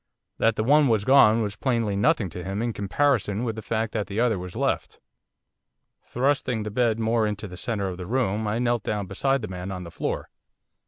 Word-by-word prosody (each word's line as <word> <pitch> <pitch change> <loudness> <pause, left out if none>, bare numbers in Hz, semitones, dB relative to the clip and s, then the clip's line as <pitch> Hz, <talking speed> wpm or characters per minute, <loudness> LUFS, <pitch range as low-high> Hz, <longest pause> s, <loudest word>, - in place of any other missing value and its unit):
That 115 -1 +3
the 110 - 0
one 145 +4 +5
was 110 -4 +1
gone 115 -5 +6
was 105 -1 -3
plainly 115 -3 0
nothing 105 - +2
to 90 - -7
him 95 +4 -3
in 120 -1 -1
comparison 105 0 0
with 115 -3 -2
the 110 - -6
fact 110 +1 -2
that 105 -3 -2
the 100 +2 -3
other 115 -5 +2
was 90 0 -8
left. - - -2 1.0
Thrusting 125 -3 0
the 105 - -5
bed 115 0 +1
more 115 0 +1
into 105 0 -4
the 90 - -9
centre 100 +1 -2
of 90 -2 -5
the 90 -1 -7
room 110 -3 0
I 105 +2 0
knelt 120 -1 +1
down 105 -2 -2
beside 135 +7 0
the - - -3
man 90 0 -6
on 90 -1 -5
the 85 - -9
floor. - - -4
110 Hz, 215 wpm, -25 LUFS, 100-120 Hz, 1.0 s, gone